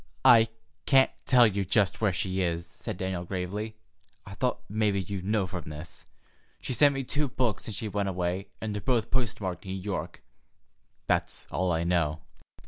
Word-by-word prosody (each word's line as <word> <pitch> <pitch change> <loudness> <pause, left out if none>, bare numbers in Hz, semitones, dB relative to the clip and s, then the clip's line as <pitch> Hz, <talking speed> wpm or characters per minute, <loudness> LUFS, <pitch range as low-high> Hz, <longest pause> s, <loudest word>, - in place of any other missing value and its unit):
"I 115 -2 +8 0.4
can't 135 -1 +6 0.2
tell 125 -2 +7
you 100 -2 +1
just 100 +2 +2
where 105 -3 +3
she 95 +1 -1
is," 85 -1 -1
said - - -7
Daniel 95 -2 -2
gravely. 100 +4 -4 0.5
"I 100 - -9
thought 125 +5 -1
mebbe 105 -1 +1
you'd 95 0 -3
know 105 0 +1
from 90 -3 -6
this. 75 +3 -9 0.5
She's 125 - -4
sent 145 -1 +6
me 135 - -1
two 145 +3 -1
books 125 -5 -1
since 105 -3 -5
she 110 - -3
went 100 -1 -1
away, 90 +1 -2
and 110 -1 -3
they're 105 - -3
both 120 -3 0
post 125 -5 0
marked 90 -3 -4
'New 95 0 -4
York.' 95 -3 -4 0.8
That's - - 0
all 90 0 +1
I 80 0 +1
know." 80 -3 +1
100 Hz, 180 wpm, -28 LUFS, 90-110 Hz, 0.8 s, I